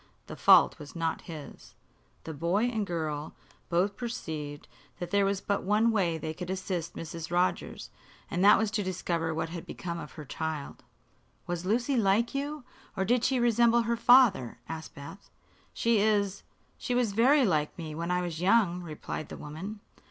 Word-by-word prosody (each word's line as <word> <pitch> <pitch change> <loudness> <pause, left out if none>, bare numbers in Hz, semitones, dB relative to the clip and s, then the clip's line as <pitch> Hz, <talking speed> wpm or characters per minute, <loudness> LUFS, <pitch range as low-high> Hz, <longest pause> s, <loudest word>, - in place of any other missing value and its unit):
The - - -8
fault - - +6
was 145 +2 -10
not 165 -1 -1
his. 155 -3 -10 0.5
The 160 - -6
boy 170 +8 0
and 235 -3 -1
the - - -1
girl 155 -4 -3 0.3
both 180 +4 +1
perceived 155 -12 -5 0.3
that 175 - -6
there 200 -1 +3
was 195 0 0
but 200 - -1
one 215 +4 +3
way 180 -7 +1
they 155 0 -4
could 180 +2 -7
assist 185 -3 -3
Mrs. 165 0 -6
Rogers, 175 +1 -1 0.4
and 180 -1 -1
that 205 +1 +8
was 220 -2 0
to 215 - 0
discover 170 -3 -2
what 160 +1 -2
had 170 0 -6
become 170 -1 -6
of 150 - -9
her 155 - -9
child. 155 0 -5 0.6
"Was 175 +1 -4
Lucy 245 +6 +1
like 220 +2 +2
you, 285 +1 -3 0.3
or 190 - +1
did 245 +2 +2
she 260 -1 +2
resemble 235 0 +4
her 235 +1 0
father?" 235 - +5
asked 160 -1 -7
Beth. 155 +8 -11 0.4
"She 230 -2 +2
is 205 -2 +1 0.4
she 245 - -2
was 240 -5 +1
very 260 +6 +5
like 155 -6 0
me 160 -3 -6
when 170 +2 -4
I 180 0 +1
was 170 -2 -4
young," 185 -3 +3
replied 155 -2 -6
the - - -7
woman. 190 +8 -7
185 Hz, 180 wpm, -29 LUFS, 160-220 Hz, 0.6 s, that